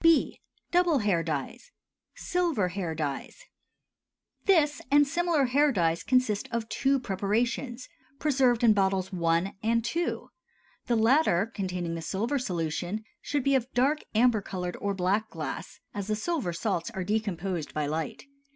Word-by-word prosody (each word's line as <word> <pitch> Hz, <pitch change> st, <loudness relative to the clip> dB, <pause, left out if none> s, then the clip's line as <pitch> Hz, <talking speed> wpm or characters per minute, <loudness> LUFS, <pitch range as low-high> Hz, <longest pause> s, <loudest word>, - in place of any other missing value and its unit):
B. 330 Hz, -1 st, +4 dB, 0.3 s
Double 350 Hz, -3 st, +4 dB
Hair 205 Hz, -8 st, +2 dB
Dyes. 155 Hz, -, -4 dB, 0.5 s
SILVER 335 Hz, -, 0 dB
HAIR 175 Hz, -3 st, -3 dB
DYES. 145 Hz, -3 st, -4 dB, 1.0 s
This 310 Hz, -7 st, +3 dB
and 290 Hz, +1 st, +6 dB
similar 330 Hz, -1 st, +1 dB
hair 285 Hz, +4 st, +3 dB
dyes 170 Hz, -6 st, +1 dB
consist 255 Hz, -2 st, +1 dB
of 235 Hz, -2 st, -2 dB
two 275 Hz, 0 st, +2 dB
preparations, 235 Hz, +4 st, -1 dB, 0.3 s
preserved 260 Hz, -5 st, +2 dB
in 225 Hz, -2 st, +7 dB
bottles 190 Hz, -1 st, +1 dB
I. 170 Hz, +2 st, +1 dB
and 230 Hz, +1 st, +1 dB
II.; 340 Hz, +1 st, 0 dB, 0.7 s
the 240 Hz, -, +2 dB
latter, 225 Hz, -, +4 dB
containing 180 Hz, -4 st, -3 dB
the 165 Hz, -, -4 dB
silver 225 Hz, -, -1 dB
solution, 175 Hz, 0 st, -2 dB, 0.2 s
should 290 Hz, -2 st, -1 dB
be 275 Hz, -, +2 dB
of 260 Hz, -1 st, +1 dB
dark 275 Hz, +5 st, +3 dB, 0.2 s
amber 230 Hz, -1 st, +4 dB
colored 180 Hz, -2 st, -4 dB
or 200 Hz, -1 st, -1 dB
black 195 Hz, +4 st, 0 dB
glass, -, -, -6 dB
as 200 Hz, -2 st, -4 dB
the 215 Hz, -, 0 dB
silver 255 Hz, -, -1 dB
salts 170 Hz, 0 st, -2 dB
are 190 Hz, -5 st, -4 dB
decomposed 190 Hz, -5 st, -2 dB
by 150 Hz, -1 st, 0 dB
light. 155 Hz, +2 st, -3 dB
215 Hz, 145 wpm, -28 LUFS, 180-270 Hz, 1.0 s, in